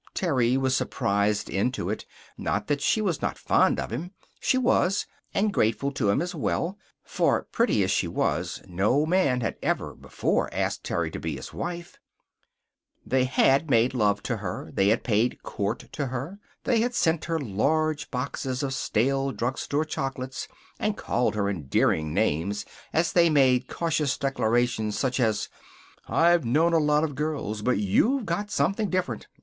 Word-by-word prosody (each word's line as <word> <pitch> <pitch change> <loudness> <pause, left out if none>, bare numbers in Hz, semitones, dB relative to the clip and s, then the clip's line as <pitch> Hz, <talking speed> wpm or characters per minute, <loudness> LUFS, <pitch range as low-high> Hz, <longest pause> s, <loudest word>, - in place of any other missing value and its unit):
Terry 130 -8 +2
was 130 -1 +1
surprised 100 +1 0
into 100 0 -1
it. 110 - -5 0.3
Not - - -2
that 145 -1 -1
she 215 +9 +2
was 185 -8 -1
not - - -2
fond - - +2
of - - -4
him. 165 - -5 0.3
She 260 - +2
was; 195 -6 +2 0.3
and 205 0 +1
grateful 115 - +1
to 130 -7 0
him, 100 - +2
as 180 +2 -4
well. 175 +5 -2 0.2
For, - - +1
pretty 230 - +1
as 95 - 0
she - - +1
was, - - -1
no 100 - +1
man 155 -8 +2
had - - -2
ever - - -1
before - - -1
asked - - -2
Terry 80 -2 -1
to - - -5
be 80 -3 -3
his 65 - -8
wife. 175 0 -6 1.1
They 130 -1 +2
had 135 +3 +3
made 120 0 +3
love 105 -4 +1
to - - -2
her. - - -5
They 95 - +2
had 110 +3 +2
paid 115 +1 +1
court 105 +3 -3
to 140 -3 -3
her. 135 +10 -5 0.2
They 235 -4 +2
had 245 +1 -1
sent 160 -5 +1
her 165 -1 -1
large 150 +6 0
boxes 130 0 -3
of 135 -1 -1
stale 135 +2 0
drugstore 135 +5 -1
chocolates, 135 -3 -4 0.3
and 210 -1 -1
called 120 -2 0
her 100 -1 0
endearing 80 -3 +1
names 85 +8 0 0.3
as 160 +1 +1
they 170 -1 +5
made 130 -4 +3
cautious 155 -4 0
declarations 120 -5 0
such 130 -1 0
as: 110 -4 +1 0.6
"I've 170 0 +4
known 155 +8 +2
a 165 - +5
lot 150 0 +3
of 155 -2 -1
girls, 140 -8 -3
but 125 +2 +1
you've 215 - +2
got 205 +1 -2
something 205 +1 0
different. 180 -12 -2
135 Hz, 165 wpm, -26 LUFS, 110-160 Hz, 1.1 s, they